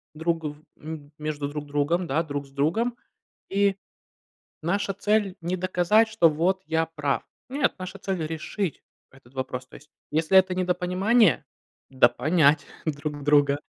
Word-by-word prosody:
друг 165 +1 -1
в 150 0 -4 0.3
м 155 -1 -8
между 150 -2 -3
друг 150 0 -5
другом, 145 +5 0
да, 160 +4 +1
друг 145 -2 -4
с - - -21
другом, 170 - 0 0.5
и 200 0 +2 0.9
наша 195 +4 0
цель 205 -1 +1
не 175 +2 -2
доказать, 185 +4 +3
что 220 -6 +4
вот 180 +5 0
я 160 0 +1
прав. 150 -3 -1 0.3
Нет, 275 +2 +1
наша 185 +1 -7
цель 190 -5 -2
решить 165 +3 -4 0.3
этот 135 -1 -20
вопрос. 130 -1 -4
То - - -13
есть 150 +1 -18 0.2
если 160 +5 +5
это 185 -1 +3
недопонимание- 180 - +2 0.5
допонять 145 +3 +4 0.2
друг 145 -1 -3
друга, 145 -1 +4
165 Hz, 145 wpm, -26 LUFS, 145-190 Hz, 0.9 s, если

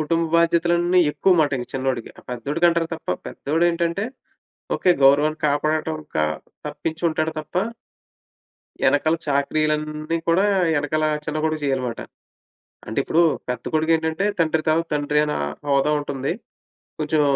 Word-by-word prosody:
కుటుంబ 165 +2 +1
బాధ్యతలన్నీ 170 +1 +3
ఎక్కువమాటింక 145 -7 +2
చిన్నోడికి. 130 -3 -2
ఆహ్, - - -16
పెద్దోడికంటారు 165 +7 +1
తప్ప, 165 - -13 0.2
పెద్దోడేంటంటే 170 +4 0 0.7
ఓకే 185 - +2
గౌరవాన్ని 150 +3 +4
కాపాడటం 155 +2 0
ఇంకా 80 - -1 0.4
తప్పించుంటాడు 160 -1 -2
తప్ప... 155 - -17 1.3
యెనకాల 160 +1 +3
చాకిరీలన్నీ 155 +2 0
కూడా, 180 +4 +4 0.3
యెనకాల 155 +1 0 0.2
చిన్న 150 +1 -3
కొడుకు 155 0 0
చేయాలిమాట. 130 -4 -1 0.9
అంటే 110 - -4
ఇప్పుడూ, 165 +5 +2 0.3
పెద్ద 125 -1 -3
కొడుకేంటంటే 160 +2 +1
తండ్రి 160 -1 +2
తరవా 160 +2 +3
తండ్రి, 150 0 +1
అనా 150 - -2 0.3
హోదా 140 +2 +3
ఉంటుంది. 140 -1 -3 0.7
కొంచెం 155 0 +1
155 Hz, 110 wpm, -22 LUFS, 145-165 Hz, 1.3 s, గౌరవాన్ని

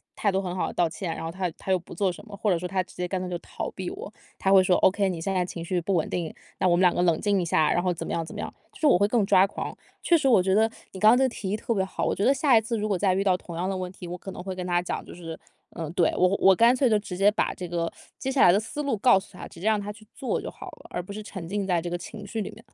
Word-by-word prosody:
态 205 - +1
度 190 - +1
很 185 -2 -4
好 - - -1
地 - - -6
道 175 - +3
歉， 165 +1 -4
然 - - -6
后 165 - -3
他 185 0 -2
他 190 - -4
又 185 - +3
不 170 - -12
做 190 +1 +1
什 175 - -11
么 205 - -9
或 205 -4 +1
者 180 +2 -3
他 185 0 0
直 - - -18
接 180 0 -2
干 185 +1 -2
脆 185 - -4
就 180 - -3
逃 - - -6
避 185 -2 -5
我。 - - -8 0.3
他 195 - +1
会 190 -1 +7
说 185 -1 +3
：“OK， 195 +1 +3
你 175 -3 -4
现 195 +4 -2
在 185 -1 +1
情 170 -1 -6
绪 175 0 -1
不 190 +3 0
稳 165 - +1
定， 170 -3 -2 0.3
那 185 - +3
我 175 - +4
们 175 - +1
两 180 -1 +5
个 - - 0
冷 170 -3 +3
静 200 -3 +1
一 - - -2
下。 160 -2 +2
“然 175 - +1
后 180 0 +1
怎 170 - -4
么 - - -4
样， 165 - -1
怎 - - -10
么 - - -6
样， - - -5 0.2
就 - - -16
是 310 - 0
我 225 - +6
会 205 - +4
更 220 -1 +2
抓 190 -1 +5
狂。 - - -6 0.3
确 345 - +4
实 275 - 0
我 230 -8 +6
觉 190 - +2
得 220 +1 +4 0.2
你 190 - -7
刚 215 +2 +7
才 245 - +5
这 265 - +3
个 260 - +3
提 200 -5 -6
议 205 - 0
特 230 +1 -2
别 190 - +1
好， 190 - -4
我 - - +1
觉 200 - -1
得 270 - +5
下 275 -4 +4
一 220 - +4
次 230 +2 -3
如 215 0 -1
果 195 -3 0
再 190 0 +2
遇 195 - +1
到 185 -2 +3
同 170 -2 -9
样 180 +2 -2
的 195 - -2
问 185 -1 -4
题， 185 -2 -10
我 180 +1 -5
可 195 - -8
能 180 - -8
会 190 - -4
跟 180 - -5
他 175 0 +2
讲 180 - -4
就 - - -11
是 165 -2 -8 0.4
嗯， 165 -3 -5
对， 175 -4 +3
我 185 - +5
我 190 -1 +6
干 235 +4 +5
脆 260 -1 +3
就 215 - +4
直 200 -3 -7
接 200 +1 +5
把 215 - 0
这 180 - -6
个 170 -1 -2 0.3
接 265 - -2
下 265 - +2
来 175 - +8
的 195 - +3
思 225 +7 -5
路 280 -4 0
告 215 -2 +5
诉 - - -14
他， - - -7
直 - - -14
接 180 - -7
让 215 -1 +3
他 205 +1 -5
去 215 0 -17
做 260 - -2
就 - - -5
好 - - -10
了， - - -15
而 - - -3
不 200 - -9
是 215 - -6
沉 190 -5 -7
浸 200 +1 -2
在 175 -2 +2
这 175 - -4
个 175 - -2
情 205 +4 -9
绪 220 +2 -3
里 - - -4
面 - - -15
了。 - - -31
190 Hz, 390 characters per minute, -26 LUFS, 175-210 Hz, 0.4 s, 来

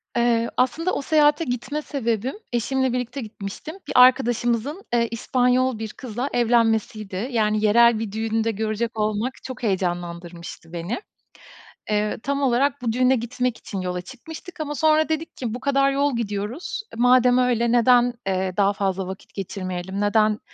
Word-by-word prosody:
Eee, 235 -1 +2
aslında 325 +8 +1
o - - -1
seyahate 300 +1 +3
gitme 250 +4 -3
sebebim, 245 - -2 0.2
eşimle 260 +2 0
birlikte 250 +2 -3
gitmiştim, 215 - -7
bir - - -4
arkadaşımızın, 250 - +3
eee, 235 -1 +3
İspanyol 250 0 +1
bir 220 -1 -4
kızla 250 +2 -4
evlenmesiydi. 225 -3 +1
Yani 215 -2 +1
yerel 235 +1 +5
bir 225 -3 -4
düğün 220 +1 -1
de 225 - +1
görecek 220 +1 -2
olmak 215 +4 0
çok 255 -1 -8
heyecanlandırmıştı 175 -3 -4
beni. 175 - -3 0.9
Eee, 210 0 0
tam 280 0 -1
olarak 265 0 +2
bu 235 - 0
düğüne 255 +1 +3
gitmek 240 +1 -2
için 195 -3 -6
yola 180 0 -3
çıkmıştık. 320 - -11
Ama 295 -1 -3
sonra 315 +1 +3
dedik 315 +1 -3
ki 235 -4 -3
bu 245 - -4
kadar 275 0 +2
yol 280 -1 +1
gidiyoruz, 220 - -3
e, - - -7
madem 250 0 +5
öyle, 235 -2 +2
neden, 245 0 +4
eee, 190 -1 0
daha 200 0 +3
fazla 190 -2 -2
vakit 190 0 -9
geçirmeyelim? 190 0 -4
Neden 215 +1 +2
235 Hz, 155 wpm, -23 LUFS, 210-255 Hz, 0.9 s, yerel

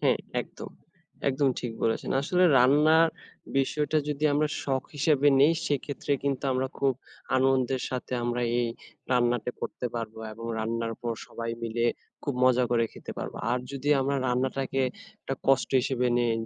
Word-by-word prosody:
হ্যাঁ, - - +3 0.2
একদম, - - -10 0.6
একদম 140 +1 +2
ঠিক 120 -2 -4
বলেছেন। 115 - 0
আসলে 180 +5 +3
রান্নার 150 +6 +5 0.5
বিষয়টা 150 +3 +1
যদি 150 0 -2
আমরা 150 +1 +2
শখ 135 -2 0
হিসেবে 145 0 +3
নেই 150 +4 +6
সেক্ষেত্রে 145 0 -2
কিন্তু 140 -1 -1
আমরা 130 +1 0
খুব 135 -1 +2 0.4
আনন্দের 130 -1 +2
সাথে 130 0 -4
আমরা 120 0 -1 0.2
এই 120 - +1 0.5
রান্নাটা 120 -1 +2
করতে 125 - -4
পারবো 115 -2 -5
এবং 115 +2 -9
রান্নার 115 +1 -2
পর 120 -1 -1
সবাই 115 0 -5
মিলে 115 +1 -1 0.4
খুব 140 - -2
মজা 125 0 +4
করে 115 -1 +3
খেতে - - -8
পারবো। - - -5
আর 125 - +2
যদি 140 +1 -4
আমরা 140 +1 0
রান্নাটাকে 130 +2 0 0.4
একটা 135 - -3
কষ্ট 135 -1 +3
হিসেবে 125 -1 0
নেই, 120 -1 +2
130 Hz, 155 wpm, -27 LUFS, 120-140 Hz, 0.6 s, নেই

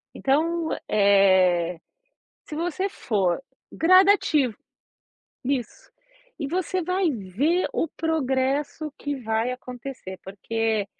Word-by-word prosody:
Então, 320 +4 +1 0.2
eh, 185 -4 +4 0.7
se 300 - -7
você 350 +4 -1
for 195 - -1 0.3
gradativo. 340 - +4 0.9
Isso. 270 - -3 0.5
E 290 - -3
você 365 +2 -1
vai 365 0 +1
ver 260 - 0
o 330 - 0
progresso 290 -1 -1
que 290 0 -3
vai 225 +2 0
acontecer, 250 -6 -8
porque 220 +2 -2
265 Hz, 95 wpm, -24 LUFS, 210-325 Hz, 0.9 s, eh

